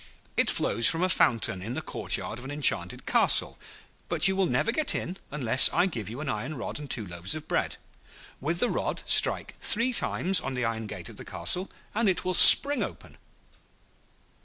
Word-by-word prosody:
It -, -, -1 dB
flows 115 Hz, +3 st, +3 dB
from 165 Hz, +2 st, -2 dB
a 185 Hz, -, -1 dB
fountain 110 Hz, -, -1 dB
in 115 Hz, +6 st, -8 dB
the -, -, -6 dB
courtyard 115 Hz, -, -5 dB
of 125 Hz, -, -13 dB
an -, -, -10 dB
enchanted 145 Hz, -1 st, -2 dB
castle; -, -, 0 dB, 0.5 s
but -, -, +2 dB
you 190 Hz, -, -1 dB
will 190 Hz, -1 st, -2 dB
never 230 Hz, -, -2 dB
get 300 Hz, +4 st, -1 dB
in 180 Hz, +2 st, -7 dB
unless 130 Hz, -3 st, +3 dB
I -, -, -1 dB
give 115 Hz, -, -7 dB
you 120 Hz, +6 st, -10 dB
an 155 Hz, -, -9 dB
iron 130 Hz, +5 st, -7 dB
rod 120 Hz, -, -8 dB
and 145 Hz, -2 st, -12 dB
two 110 Hz, -, -4 dB
loaves 85 Hz, -, -6 dB
of 155 Hz, -, -11 dB
bread. -, -, -4 dB, 0.6 s
With 165 Hz, +5 st, -5 dB
the 245 Hz, -, -1 dB
rod -, -, -5 dB
strike -, -, +2 dB
three 235 Hz, +3 st, 0 dB
times 190 Hz, -5 st, 0 dB
on 135 Hz, -, -7 dB
the 125 Hz, -1 st, -4 dB
iron 115 Hz, -1 st, -6 dB
gate 95 Hz, -5 st, -9 dB
of -, -, -16 dB
the -, -, -11 dB
castle, 180 Hz, -, -3 dB, 0.2 s
and 220 Hz, -1 st, -2 dB
it 185 Hz, -, -3 dB
will 185 Hz, -, -3 dB
spring 280 Hz, +9 st, +10 dB
open. -, -, -10 dB
145 Hz, 200 wpm, -24 LUFS, 115-185 Hz, 0.6 s, spring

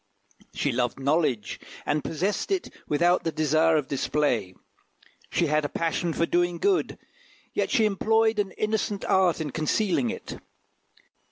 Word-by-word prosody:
She -, -, 0 dB
loved 120 Hz, +1 st, -1 dB
knowledge, 135 Hz, -, 0 dB, 0.3 s
and 145 Hz, 0 st, 0 dB
possessed 185 Hz, +6 st, -2 dB
it 385 Hz, -2 st, -2 dB
without 175 Hz, +4 st, +2 dB
the 165 Hz, -, -1 dB
desire 155 Hz, +1 st, +3 dB
of 145 Hz, -3 st, -1 dB
display; 125 Hz, -9 st, 0 dB, 0.7 s
she 175 Hz, -, +1 dB
had 155 Hz, 0 st, +1 dB
a 145 Hz, -, -2 dB
passion 165 Hz, +1 st, -1 dB
for 170 Hz, -, +1 dB
doing 175 Hz, 0 st, +1 dB
good, 390 Hz, -, +1 dB, 0.6 s
yet -, -, 0 dB
she 220 Hz, -, +3 dB
employed 220 Hz, +2 st, +2 dB
an 200 Hz, -2 st, 0 dB
innocent 215 Hz, -2 st, -1 dB
art 185 Hz, -3 st, +3 dB
in 155 Hz, -3 st, -3 dB
concealing 195 Hz, -, 0 dB
it. 230 Hz, -, -7 dB
165 Hz, 145 wpm, -26 LUFS, 150-205 Hz, 0.7 s, desire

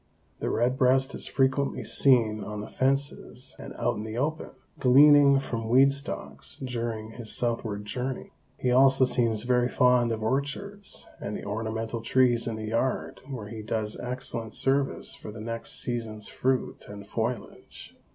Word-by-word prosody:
The -, -, -2 dB
red 125 Hz, +2 st, +1 dB
breast 130 Hz, +1 st, +3 dB
is -, -, 0 dB
frequently 135 Hz, +1 st, +1 dB
seen 115 Hz, -6 st, +3 dB
on 105 Hz, -1 st, -5 dB
the -, -, -7 dB
fences 135 Hz, +2 st, -1 dB
and -, -, -8 dB
out -, -, -1 dB
in -, -, -4 dB
the 110 Hz, +1 st, -6 dB
open, 155 Hz, +4 st, -2 dB, 0.3 s
gleaning 140 Hz, +1 st, +7 dB
from 115 Hz, -4 st, -3 dB
weed 135 Hz, +3 st, +6 dB
stalks, 140 Hz, 0 st, -4 dB
during 115 Hz, -3 st, -4 dB
his 115 Hz, -1 st, -5 dB
southward 115 Hz, -4 st, -2 dB
journey. 125 Hz, +4 st, -4 dB, 0.3 s
He 125 Hz, -, 0 dB
also 135 Hz, +1 st, +5 dB
seems 115 Hz, -4 st, +1 dB
very 125 Hz, 0 st, +2 dB
fond 125 Hz, -2 st, +3 dB
of 110 Hz, -1 st, -3 dB
orchards 145 Hz, -, -3 dB
and 105 Hz, +1 st, -4 dB
the -, -, -9 dB
ornamental 110 Hz, +2 st, -3 dB
trees 120 Hz, 0 st, +3 dB
in 115 Hz, -, -2 dB
the 110 Hz, 0 st, -5 dB
yard 120 Hz, +3 st, -1 dB
where 115 Hz, -6 st, -6 dB
he 110 Hz, 0 st, -7 dB
does 110 Hz, 0 st, -2 dB
excellent 125 Hz, -3 st, -4 dB
service 135 Hz, +1 st, 0 dB
for 105 Hz, -, -9 dB
the 110 Hz, -, -10 dB
next 115 Hz, +1 st, -1 dB
season's 115 Hz, -3 st, -4 dB
fruit 130 Hz, 0 st, -1 dB
and 100 Hz, -1 st, -9 dB
foliage. 115 Hz, +1 st, -5 dB
120 Hz, 160 wpm, -27 LUFS, 110-130 Hz, 0.3 s, gleaning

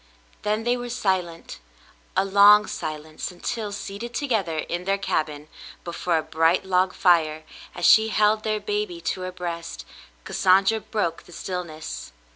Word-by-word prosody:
Then 215 Hz, +1 st, -1 dB
they 240 Hz, +1 st, +2 dB
were 245 Hz, 0 st, -6 dB
silent, 185 Hz, -7 st, -2 dB, 0.6 s
a 190 Hz, -, +3 dB
long 205 Hz, +2 st, +7 dB
silence, 155 Hz, 0 st, -5 dB
until, 205 Hz, +4 st, -4 dB
seated 205 Hz, +4 st, -6 dB
to 290 Hz, -, -1 dB
gether 195 Hz, -, 0 dB
in 175 Hz, +3 st, -3 dB
their 195 Hz, +1 st, +1 dB
cabin 150 Hz, -5 st, -2 dB, 0.4 s
before 170 Hz, 0 st, -1 dB
a 160 Hz, -, -1 dB
bright 165 Hz, +5 st, +2 dB
log 185 Hz, 0 st, +1 dB
fire, 160 Hz, -3 st, +3 dB, 0.3 s
as 175 Hz, -, -2 dB
she 220 Hz, 0 st, +7 dB
held 215 Hz, 0 st, +2 dB
their 215 Hz, -1 st, -1 dB
baby 205 Hz, -4 st, -3 dB
to 185 Hz, -, -3 dB
her 185 Hz, 0 st, -4 dB
breast, 170 Hz, -, -6 dB, 0.4 s
Cassandra 195 Hz, +4 st, +3 dB
broke 205 Hz, -7 st, -2 dB
the -, -, -16 dB
stillness. 165 Hz, -, -6 dB
185 Hz, 150 wpm, -24 LUFS, 170-210 Hz, 0.6 s, long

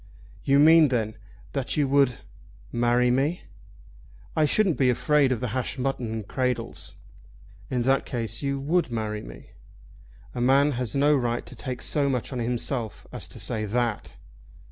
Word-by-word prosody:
"You 140 Hz, 0 st, +3 dB
mean 160 Hz, +2 st, +7 dB
then 110 Hz, -4 st, -1 dB, 0.4 s
that 135 Hz, 0 st, -3 dB
you 145 Hz, -2 st, +2 dB
would 135 Hz, -2 st, +2 dB, 0.5 s
marry 120 Hz, +1 st, +2 dB
me?" 140 Hz, +7 st, 0 dB, 0.9 s
"I 155 Hz, -, +3 dB
shouldn't 185 Hz, +2 st, +2 dB
be 130 Hz, -2 st, +4 dB
afraid 140 Hz, +2 st, +3 dB
of 125 Hz, -, -1 dB
the 125 Hz, -, -2 dB
hashed 130 Hz, +3 st, -3 dB
mutton 125 Hz, -3 st, -2 dB
and 110 Hz, -2 st, -5 dB
cradles." 125 Hz, -2 st, -3 dB, 0.7 s
"In 125 Hz, -2 st, 0 dB
that 135 Hz, +2 st, +2 dB
case 115 Hz, -2 st, -3 dB
you 140 Hz, -1 st, -1 dB
would 160 Hz, +3 st, +1 dB
marry 110 Hz, -2 st, -3 dB
me?" -, -, -12 dB, 0.8 s
"A 120 Hz, -, -3 dB
man 135 Hz, +4 st, +4 dB
has 125 Hz, -3 st, -3 dB
no 145 Hz, +2 st, +4 dB
right 120 Hz, -3 st, -1 dB
to -, -, -11 dB
take 130 Hz, -2 st, -5 dB
so 140 Hz, -2 st, +1 dB
much 130 Hz, 0 st, -2 dB
on 125 Hz, -, -3 dB
himself 120 Hz, -1 st, -3 dB
as -, -, -6 dB
to -, -, -10 dB
say 110 Hz, -3 st, -3 dB
that." 115 Hz, +1 st, -2 dB
125 Hz, 165 wpm, -26 LUFS, 120-140 Hz, 0.9 s, mean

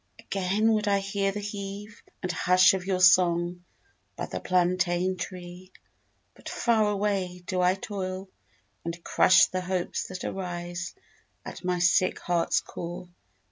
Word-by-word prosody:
Again 200 Hz, +4 st, 0 dB
would 215 Hz, -1 st, 0 dB
I 200 Hz, -1 st, +3 dB
hear 195 Hz, 0 st, -1 dB
The 210 Hz, -, -5 dB
heave 205 Hz, +1 st, -7 dB, 0.2 s
and 180 Hz, -, -1 dB
hush 185 Hz, +2 st, +5 dB
Of 190 Hz, -1 st, -4 dB
your 190 Hz, -2 st, 0 dB
song 175 Hz, 0 st, +4 dB, 0.5 s
by -, -, -4 dB
the -, -, -5 dB
plantain 180 Hz, 0 st, +1 dB
tree. 180 Hz, 0 st, -8 dB, 0.6 s
But -, -, -10 dB
far 220 Hz, -3 st, +2 dB
away 195 Hz, -3 st, -1 dB
Do 185 Hz, 0 st, -1 dB
I 180 Hz, +1 st, +3 dB
toil 190 Hz, -1 st, -5 dB, 0.6 s
and 170 Hz, 0 st, -6 dB
crush 190 Hz, +1 st, +5 dB
The 185 Hz, -, -3 dB
hopes 180 Hz, -1 st, -2 dB
that 185 Hz, -1 st, -7 dB
arise 175 Hz, -1 st, -5 dB, 0.5 s
At -, -, -8 dB
my 180 Hz, 0 st, 0 dB
sick 175 Hz, +1 st, +3 dB
heart's 175 Hz, -1 st, +1 dB
core. 175 Hz, +1 st, -7 dB
185 Hz, 140 wpm, -27 LUFS, 180-195 Hz, 0.6 s, hush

